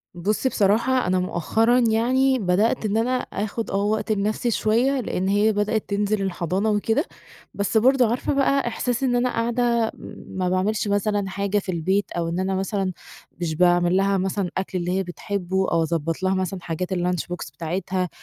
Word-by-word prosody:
بُصّي، 210 +9 0
بصراحة 235 +3 +2
أنا 185 0 +2
مؤخرًا 225 +8 +2
يعني 250 +3 +2
بدأت 210 +5 +1
إن 210 +1 0
أنا 250 +3 +1
آخد 220 -1 -4
آه - - -2
وقت 215 +1 0
لنفسي 215 +3 0
شويّة، 245 +6 +2
لإن 190 -5 -2
هي 205 +2 +3
بدأت 210 +1 -1
تنزل 205 0 0
الحضانة 190 +2 -1
وكده، 225 - +1 0.5
بس 200 +2 0
برضه 250 0 +4
عارفة 245 +4 -1
بقى 275 -1 +2
إحساس 245 +2 -2
إن 245 -2 +2
أنا 250 +1 +2
قاعدة 235 -1 +1 0.4
ما 185 -1 -2
باعملش 205 +3 0
مثلًا 205 -1 0
حاجة 200 +2 0
في 190 - -4
البيت، 190 +4 0
أو 170 -1 -2
إن 175 +2 -2
أنا 190 0 0
مثلًا 195 0 -1 0.5
مش 160 -2 -1
باعمل 175 +1 +3
لها 195 0 +2
مثلًا 190 0 -1
أكل 190 -1 -2
اللي 175 0 -2
هي 190 +1 0
بتحبه، 190 +1 -2
أو 165 -1 +2
أضبط 165 +2 -2
لها 190 0 +2
مثلًا 185 0 -2
حاجات 180 +3 -3
الLunch 180 -1 0
Box 140 -5 -6
بتاعتها، 180 +3 -2
200 Hz, 175 wpm, -23 LUFS, 185-225 Hz, 0.5 s, برضه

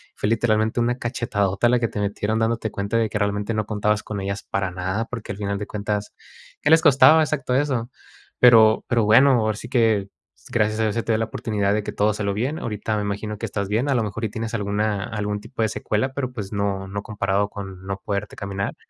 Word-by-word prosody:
Fue - - -2
literalmente 110 0 +1
una 120 +1 +1
cachetadota 110 -3 0
la 125 0 +3
que 115 - +1
te - - -5
metieron, 105 +2 -1
dándote 115 0 0
cuenta 100 +3 -2
de 115 -1 +2
que 105 - -2
realmente 105 +1 -1
no 110 -1 -1
contabas 105 0 0
con 105 -2 -5
ellas 100 +1 -4
para 100 -2 -1
nada, 95 +5 -2
porque 115 -3 -6
al - - -10
final 100 -1 -2
de 105 - -5
cuentas, 105 0 -3 0.5
¿qué 150 - +1
les 160 0 +7
costaba 155 +1 +7
exacto 140 -4 -1
eso? 130 -4 0 0.5
Pero, 110 -3 +6
pero 115 -2 +2
bueno, 125 +6 +6
ahora 110 -1 0
sí 120 - -8
que 110 -5 +2 0.4
gracias 110 -1 +1
a - - +2
Dios 110 -2 0
se 115 - -1
te 115 - 0
dio - - +2
la 115 - +1
oportunidad 105 -2 -1
de 105 0 0
que - - -4
todo 105 +1 +2
salió 100 -1 -2
bien. 130 +10 -2
Ahorita 110 -1 -3
me 105 - -1
imagino 105 +1 -3
que 115 - -4
estás 100 -1 -3
bien, 115 +7 0
a - - +3
lo 120 - +2
mejor 110 +2 -3
y - - -2
tienes 110 +1 -5
alguna 105 -1 -1
algún 105 -1 -3
tipo 115 +2 -6
de 110 - +1
secuela, 110 +4 -1
pero 130 -2 -3
pues 105 -5 -6
no 100 -1 -1
no 100 +1 -4
comparado 100 -1 -1
con 95 -2 -8
no 100 0 -4
poderte 100 0 -3
caminar. 100 0 -4
105 Hz, 230 wpm, -23 LUFS, 100-115 Hz, 0.5 s, les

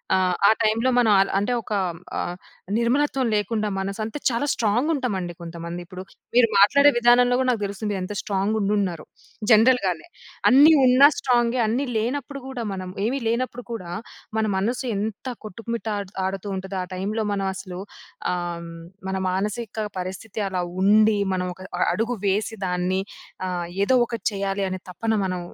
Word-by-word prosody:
ఆహ్, 185 -1 +2
ఆ - - +7
టైమ్‌లో 225 +3 +2
మనం 230 -3 +4
అల 195 - +4
అంటే 245 +5 0
ఒక 215 - -14 0.5
ఆహ్, 175 +1 -3 0.4
నిర్మలత్వం 265 +2 +1
లేకుండా 210 0 0
మనసంతే 215 +7 -3
చాలా 235 +4 -1
స్ట్రాంగ్ 235 +7 +1
ఉంటామండి 190 - -2
కొంతమంది. 170 +1 -6
ఇప్పుడు 185 +1 -9 0.3
మీరు 245 -2 +6
మాట్లాడే 280 +9 +7
విధానంలో 245 +1 +5
గూడా 260 - +1
నాకు 225 -4 -2
తెలుస్తుంది 200 +1 -3
ఎంత 185 +3 -4
స్ట్రాంగ్ 200 +2 -1
ఉండున్నారో 195 -5 0 0.5
జనరల్‌గానే. 215 -7 +4 0.4
అన్నీ 285 +5 +8
ఉన్న 255 +2 +4 0.2
స్ట్రాంగే, 240 -1 +2
అన్నీ 250 +6 0
లేనప్పుడు 275 +4 -3
గూడా 250 -3 -4
మనం 185 -1 -5 0.2
ఏమి 270 +4 0
లేనప్పుడు 245 +1 -1
కూడా 185 -7 -5 0.5
మన 220 - +2
మనసు 235 +7 -1
ఎంత 215 +4 -4 0.2
కొట్టుమిట్టాడుతూ 205 -3 -4
ఉంటాదో 190 0 -5
ఆ - - -5
టైమ్‌లో 210 +4 -2
మనం 195 -1 -1
అసలు 185 -1 -7 0.5
ఆహ్, 175 -1 -4 0.4
మన 190 - -1
మానసిక 210 +3 -2
పరిస్థితి 190 +4 -5
అలా 180 -1 -1 0.2
ఉండి, 215 +1 +5 0.2
మనం 180 0 -2
ఒక 185 - -15 0.2
అ - - +6
అడుగు 230 +2 -1
వేసి 210 +3 0
దాన్ని 180 +1 0 0.5
ఆహ్, 175 -1 -3 0.2
ఏదో 255 +5 +4
ఒకటి 230 -4 -6
చేయాలి 195 0 -1
అనే 185 -1 -5
తపన 225 +5 -2
మనం 185 -1 -2
210 Hz, 150 wpm, -24 LUFS, 190-240 Hz, 0.5 s, అన్నీ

